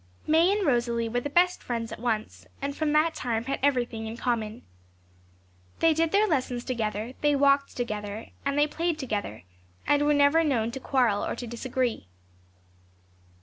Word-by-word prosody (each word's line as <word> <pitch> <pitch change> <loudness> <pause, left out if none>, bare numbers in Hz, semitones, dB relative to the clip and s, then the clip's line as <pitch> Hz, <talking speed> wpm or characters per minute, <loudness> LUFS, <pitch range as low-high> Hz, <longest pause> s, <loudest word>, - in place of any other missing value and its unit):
May 325 +4 +4
and 410 -1 0
Rosalie 235 -4 +1
were 245 +2 0
the 290 - -4
best 360 +4 +3
friends 230 -2 -4
at - - -7
once, 225 -2 -3
and 280 0 -3
from 310 -1 0
that 315 +2 +3
time 230 -2 -2
had 270 +2 -3
everything 245 -5 0
in 225 +1 -6
common. 230 -3 -2 1.1
They 330 -1 +4
did 325 +1 +1
their 410 +2 +4
lessons 255 -7 -1
together, 225 -1 -3
they 295 -1 +3
walked 280 0 +2
together, 210 -2 -4
and 280 0 -1
they 295 - +5
played 330 +2 -2
together, 210 - -4 0.4
and 290 0 +3
were 295 0 +3
never 285 +3 +4
known 235 -7 0
to 265 - -6
quarrel 245 -6 +1
or - - -2
to 245 - -6
disagree. 240 - -2
255 Hz, 170 wpm, -27 LUFS, 230-295 Hz, 1.1 s, they